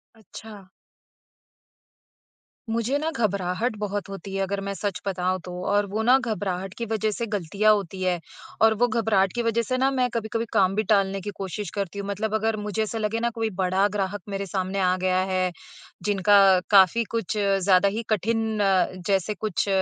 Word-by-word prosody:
अच्छा। 215 -1 -12 2.1
मुझे 230 +4 0
ना 310 +2 -1 0.2
घबराहट 200 +4 -1
बहुत 205 -1 -3
होती 195 0 -8
है 195 - -1
अगर 195 +1 -2
मैं 200 - -2
सच 195 -1 -4
बताऊँ 185 -1 -1
तो, 180 - -7
और 205 +1 +2
वो 210 +3 -2
ना 250 +3 +6
घबराहट 195 -6 -3
की 235 - -3
वज़ह 220 -1 -1
से 230 +3 -3
ग़लतियाँ 205 +1 +2
होती 195 -2 -3
हैं, 180 -1 +1 0.4
और 220 0 +6
वो 240 +3 +2
घबराहट 215 -5 +1
की 240 - -1
वज़ह 230 0 +1
से 255 +3 -1
ना 265 +1 +3
मैं 255 -2 +1
कभी-कभी 230 0 -2
काम 190 0 +3
भी 215 - +1
टालने 195 -1 +1
की 205 - -5
कोशिश 195 +1 -4
करती 200 -1 -3
हूँ। 200 - -5
मतलब 205 +2 -2
अगर 220 0 0
मुझे 210 +1 -3
ऐसा 220 +1 -4
लगे 220 +1 -1
ना 235 +1 0
कोई 225 -1 -1
बड़ा 190 +2 +2
ग्राहक 205 0 -3
मेरे 200 0 -3
सामने 190 +1 -2
आ 185 -1 +2
गया 185 0 +2
है, 185 -1 0 0.5
जिनका 200 -1 +5
काफ़ी 200 +3 +6
कुछ 225 -2 -2
ज़्यादा 195 -1 +3
ही 220 +4 -3
कठिन 220 +1 0 0.5
जैसे 195 +1 +1
कुछ 210 -1 -2
205 Hz, 180 wpm, -25 LUFS, 190-220 Hz, 2.1 s, ना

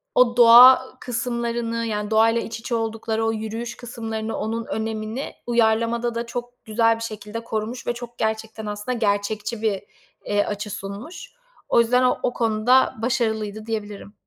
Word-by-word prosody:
o 245 -1 +4
doğa 245 +2 +9 0.2
kısımlarını, 235 -1 -2
yani, 210 -1 -3
doğayla 225 +1 +4
iç 225 0 -6
içe 240 +1 -3
oldukları 225 0 -2
o 225 - +2
yürüyüş 225 +2 -5
kısımlarını, 225 -2 -5
onun 225 +1 -3
önemini 220 +3 -4
uyarlamada 235 0 +1
da 235 - -2
çok 245 +1 -7
güzel 225 +1 +3
bir 225 - -10
şekilde 215 +1 -6
korumuş 225 +2 -4
ve 240 - +1
çok, 240 0 -9
gerçekten, 220 0 -3
aslında 210 +4 -3
gerçekçi 210 +1 -1
bir, 205 -3 0 0.4
eee, 205 0 +1
açı 210 +1 -4
sunmuş. 205 - -8 0.4
O - - +4
yüzden 250 +2 +2
o 250 - +3
o 245 - 0
konuda 230 +3 +3
başarılıydı 220 -3 -1
diyebilirim. 210 -2 -5
225 Hz, 150 wpm, -23 LUFS, 220-235 Hz, 0.4 s, doğa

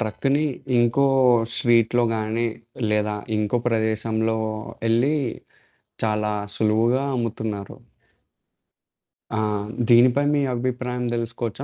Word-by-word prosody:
ట్రక్‌ని 135 +7 0 0.3
ఇంకో 120 +4 +3 0.5
స్ట్రీట్‌లో 120 0 +3
గాని 110 +2 -1 0.5
లేదా 105 0 0 0.2
ఇంకో 105 +3 0
ప్రదేశంలో 110 0 0 0.5
యెళ్లి 120 +7 +2 0.9
చాలా 105 -1 0 0.2
సులువుగా 115 +5 +2
అమ్ముతున్నారు. 110 -4 -4 1.5
ఆ! 110 - -2 0.5
దీనిపై 125 +3 +5
మీ 145 - +2
అభిప్రాయం 125 0 -3
తెలుసుకోవచ్చా? 115 +1 -4
115 Hz, 85 wpm, -23 LUFS, 110-125 Hz, 1.5 s, దీనిపై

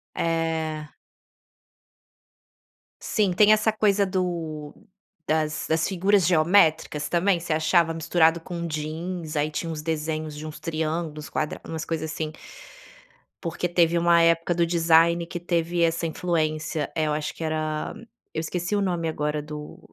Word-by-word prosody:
É. 160 -2 -2 2.1
Sim, 205 -4 +1
tem 210 +4 +6
essa 215 +1 +3
coisa 205 -2 +2
do 170 -5 -3 0.5
das 155 0 0
das 160 0 +1
figuras 195 0 +2
geométricas 160 -3 +3
também? 175 +2 +2
Você 165 -1 -3
achava 160 +2 +3
misturado 165 +1 +3
com 170 0 -5
jeans, 160 +1 -4
aí 150 +1 +1
tinha 165 +2 -3
uns 155 -2 -5
desenhos 155 -1 -3
de 155 +1 -7
uns 155 0 -8
triângulos, 155 -1 -3
quadra 155 -1 -2
umas 160 -1 -4
coisa, 160 -1 -3
assim. 155 0 -4 1.1
Porque 175 +1 -2
teve 170 -1 +3
uma 170 0 +5
época 165 +1 +3
do 170 0 +2
design 170 0 +3
que 175 - -5
teve 170 0 0
essa 165 0 +1
influência 155 -3 -1
eh, 160 - +2
eu - - 0
acho 150 0 -3
que 165 - -6
era 155 -1 -2 0.4
eu 160 - -2
esqueci 175 +4 -2
o 205 - +2
nome 175 -4 -1
agora 150 -1 -2
do 150 0 -8
165 Hz, 145 wpm, -25 LUFS, 155-175 Hz, 2.1 s, tem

